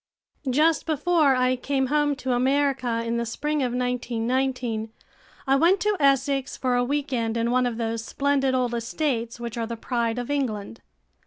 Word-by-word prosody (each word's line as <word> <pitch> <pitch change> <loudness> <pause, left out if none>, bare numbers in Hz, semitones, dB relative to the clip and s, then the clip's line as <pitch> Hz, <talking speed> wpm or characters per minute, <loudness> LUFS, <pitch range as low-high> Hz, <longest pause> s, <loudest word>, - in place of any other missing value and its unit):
Just 310 +6 +2
before 310 -2 +3
I 255 0 +2
came 265 +1 -1
home 295 -1 +2
to 260 -1 -2
America 260 -2 +1
in 230 0 -1
the 235 - 0
Spring 295 +6 -2
of 250 -2 0
1919, 245 -1 -1 0.5
I 270 -1 +3
went 340 +7 +4
to 420 0 +2
Essex 275 -1 +2
for 255 -1 0
a 245 - +2
week 285 +2 -2
end 230 -2 -1
in 230 +1 0
one 250 0 +2
of 235 -2 -4
those 225 -1 -2
splendid 275 +1 +1
old 250 -2 0
estates 235 0 -2
which 235 -1 -5
are 225 - -2
the 235 0 -5
pride 235 -1 -1
of 245 +3 -3
England. 230 -6 -3
255 Hz, 175 wpm, -25 LUFS, 235-280 Hz, 0.5 s, went